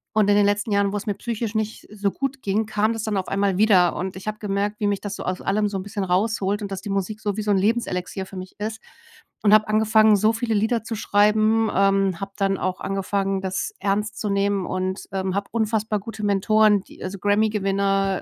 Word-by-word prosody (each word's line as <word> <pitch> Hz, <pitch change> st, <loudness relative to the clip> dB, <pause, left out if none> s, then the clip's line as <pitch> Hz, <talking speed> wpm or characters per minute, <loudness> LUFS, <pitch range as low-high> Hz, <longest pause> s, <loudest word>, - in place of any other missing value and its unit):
Und, 210 Hz, -2 st, +3 dB
in 205 Hz, -, +5 dB
den 205 Hz, -, +4 dB
letzten 205 Hz, +1 st, 0 dB
Jahren, 200 Hz, 0 st, +2 dB
wo -, -, 0 dB
es 205 Hz, -, -7 dB
mir 205 Hz, -, 0 dB
psychisch 230 Hz, -1 st, -4 dB
nicht 220 Hz, 0 st, -3 dB
so 200 Hz, -2 st, -1 dB
gut 270 Hz, -1 st, -4 dB
ging, 205 Hz, +3 st, 0 dB
kam 215 Hz, +1 st, +1 dB
das 225 Hz, -, -4 dB
dann 215 Hz, -3 st, -1 dB
auf 185 Hz, -, -2 dB
einmal 195 Hz, -1 st, +1 dB
wieder. 190 Hz, -5 st, +4 dB
Und, 185 Hz, +1 st, -4 dB
ich 190 Hz, +2 st, -10 dB
habe 215 Hz, 0 st, -3 dB
gemerkt, 205 Hz, +1 st, -2 dB
wie 210 Hz, -, +1 dB
mich 200 Hz, -1 st, -1 dB
das 205 Hz, -1 st, -5 dB
so -, -, -6 dB
aus 185 Hz, 0 st, -2 dB
allem 210 Hz, +1 st, +1 dB
so 200 Hz, -, -3 dB
'n 190 Hz, -, -3 dB
bisschen 205 Hz, 0 st, -4 dB
rausholt 200 Hz, +2 st, 0 dB
und 200 Hz, -, -5 dB
dass 190 Hz, -1 st, -4 dB
die 205 Hz, -, -7 dB
Musik 195 Hz, +2 st, -2 dB
so 205 Hz, -2 st, -2 dB
wie -, -, -1 dB
so 210 Hz, -, -3 dB
'n 200 Hz, -, +4 dB
Lebenselixier 190 Hz, -3 st, -1 dB
für 195 Hz, -, -12 dB
mich 185 Hz, 0 st, -8 dB
ist 220 Hz, +1 st, -4 dB, 0.6 s
und 210 Hz, -, +5 dB
habe 215 Hz, 0 st, +3 dB
angefangen, 215 Hz, 0 st, +5 dB
so 215 Hz, +2 st, +3 dB
viele 230 Hz, 0 st, -1 dB
Lieder 220 Hz, +2 st, +1 dB
zu 225 Hz, -, -5 dB
schreiben, 215 Hz, +2 st, +3 dB
ähm, 195 Hz, -2 st, +2 dB
habe 195 Hz, 0 st, -5 dB
dann 195 Hz, -1 st, +1 dB
auch 185 Hz, 0 st, -2 dB
angefangen, 195 Hz, 0 st, -1 dB
das 190 Hz, -, -3 dB
ernst 210 Hz, +2 st, -1 dB
zu 210 Hz, -, -2 dB
nehmen 200 Hz, -1 st, +1 dB
und, 185 Hz, +1 st, -3 dB
ähm, 190 Hz, -1 st, -2 dB
habe 200 Hz, 0 st, -2 dB
unfassbar 220 Hz, -2 st, 0 dB
gute 215 Hz, +1 st, -8 dB
Mentoren, 205 Hz, 0 st, +3 dB
die -, -, -13 dB
also 190 Hz, +1 st, -5 dB
Grammy 205 Hz, +3 st, +2 dB
Gewinner, 195 Hz, -1 st, 0 dB
205 Hz, 235 wpm, -23 LUFS, 195-215 Hz, 0.6 s, in